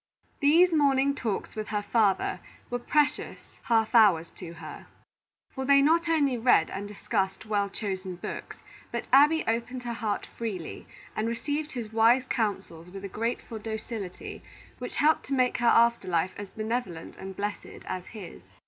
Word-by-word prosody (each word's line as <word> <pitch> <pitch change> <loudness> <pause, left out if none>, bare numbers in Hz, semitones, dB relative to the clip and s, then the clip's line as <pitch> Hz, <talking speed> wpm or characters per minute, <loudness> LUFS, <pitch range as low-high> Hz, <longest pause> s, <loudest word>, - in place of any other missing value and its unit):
These 330 +5 +5
morning 280 -2 +3
talks 225 -8 -3
with 215 -1 -4
her 210 -1 -2
father 205 -3 +1 0.3
were 245 - -1
precious 295 +4 +1 0.3
half 225 -1 +2
hours 195 -8 +5
to 170 -3 -9
her; 160 -2 -10 0.6
for 265 - -4
they 280 +1 +6
not 330 +3 +3
only 285 -6 +2
read 225 -9 +4
and 200 +1 -5
discussed 195 -1 -2
well 205 -2 0
chosen 190 -3 -4
books, 175 - -7 0.3
but - - -3
Abby 300 +4 +6
opened 235 +2 -2
her 240 -1 -3
heart 220 -2 -2
freely, 205 -8 -6 0.3
and 215 - -1
received 290 +6 -3
his 225 -4 -6
wise 230 +3 +5
counsels 190 -7 -2
with 195 +2 -8
a - - -5
grateful 230 +2 -3
docility 220 -3 -6 0.4
which - - -6
helped 310 +2 +3
to 275 - -3
make 250 -2 +2
her 240 - +2
after 235 -4 +4
life 180 +1 0
as 205 -1 -7
benevolent 215 -7 -4
and 190 0 -8
blessed 205 +1 -5
as 185 -1 -5
his. 200 - -10
225 Hz, 160 wpm, -28 LUFS, 195-260 Hz, 0.6 s, they